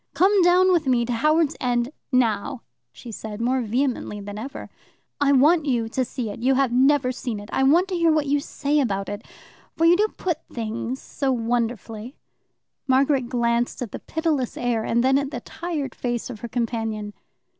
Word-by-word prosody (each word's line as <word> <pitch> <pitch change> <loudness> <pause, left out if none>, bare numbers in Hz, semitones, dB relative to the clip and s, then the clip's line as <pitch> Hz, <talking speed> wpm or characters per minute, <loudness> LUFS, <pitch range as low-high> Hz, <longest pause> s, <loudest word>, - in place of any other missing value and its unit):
"Come 380 +6 +4
down 360 +1 +5
with 335 -5 +2
me 245 -2 +3
to 245 - -2
Howards 305 +5 +2
End 245 0 0 0.2
now," 250 +1 +1 0.3
she 230 - -10
said, 215 0 -7
more 250 +3 +1
vehemently 240 -2 -1
than 205 +1 -7
ever. 270 +5 -7 0.5
"I 285 -1 +3
want 300 +4 +4
you 235 -4 +1
to 260 +3 0
see 245 -3 -4
it. - - -8
You 265 +2 +3
have 270 -2 +2
never 265 +1 +3
seen 240 -3 -4
it. 205 +2 -11
I - - +1
want 325 +8 +4
to 370 - -2
hear 335 -1 +3
what 305 -1 +2
you 285 +1 +2
say 285 +1 -1
about 195 -7 -1
it, 205 +1 -6 0.5
for 330 - +3
you 340 +1 +7
do 420 +4 +3
put 345 -4 -1
things 230 +2 -4
so 275 -2 -2
wonderfully." 235 0 -2 0.7
Margaret 265 -1 +2
glanced 235 -1 0
at 225 - -7
the - - -6
pitiless 315 -6 -2
air 240 -2 0
and 235 +2 +1
then 265 +1 +4
at 280 -1 -3
the - - -6
tired 315 -6 -4
face 240 0 -3
of 220 - -9
her 235 - -6
companion. 225 -3 -3
255 Hz, 190 wpm, -23 LUFS, 230-290 Hz, 0.7 s, you